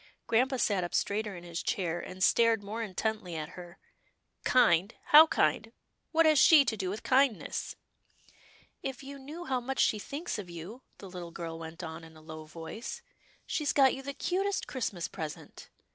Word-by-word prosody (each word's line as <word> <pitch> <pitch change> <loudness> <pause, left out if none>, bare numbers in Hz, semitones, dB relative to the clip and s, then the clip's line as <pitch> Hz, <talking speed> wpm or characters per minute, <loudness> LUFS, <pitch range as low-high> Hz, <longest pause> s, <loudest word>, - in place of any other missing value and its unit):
Grampa 260 +4 +2
sat 200 -6 +1
up 175 - -4
straighter 205 0 -1
in 175 - -10
his 170 -1 -5
chair, 175 -3 -1
and 185 +1 -5
stared 230 -1 +4
more 215 +3 -5
intently 215 -3 -3
at 155 -1 -4
her. 180 0 -11 0.4
" - - -50
Kind 205 -5 +4
— - - -37
how 310 +2 +10
kind 210 - +1 0.2
— - - -50
what 330 0 +4
has 310 -2 +5
she 300 -2 +7
to 225 - 0
do 190 -3 -3
with 210 +4 -5
kindness? 265 -3 +1 0.4
" - - -29
" - - -26 0.3
If 270 0 -5
you 280 +1 -9
knew 305 +6 -8
how 260 -4 0
much 260 +2 -4
she 215 - +3
thinks 285 +4 -5
of 190 -4 -7
you," 170 +9 -9 0.2
the 195 - -10
little 180 -2 -8
girl 165 -1 -6
went 165 +2 -8
on 160 0 -7
in 160 -1 -14
a - - -15
low 155 0 -9
voice. 165 +9 -8 0.2
" - - -33
She's 300 -2 -1
got 270 -2 +5
you 270 - -6
the 280 +1 -6
'cutest 390 +3 -1
Christmas 205 -9 -3
present." 155 -2 -8
210 Hz, 205 wpm, -30 LUFS, 170-265 Hz, 0.4 s, how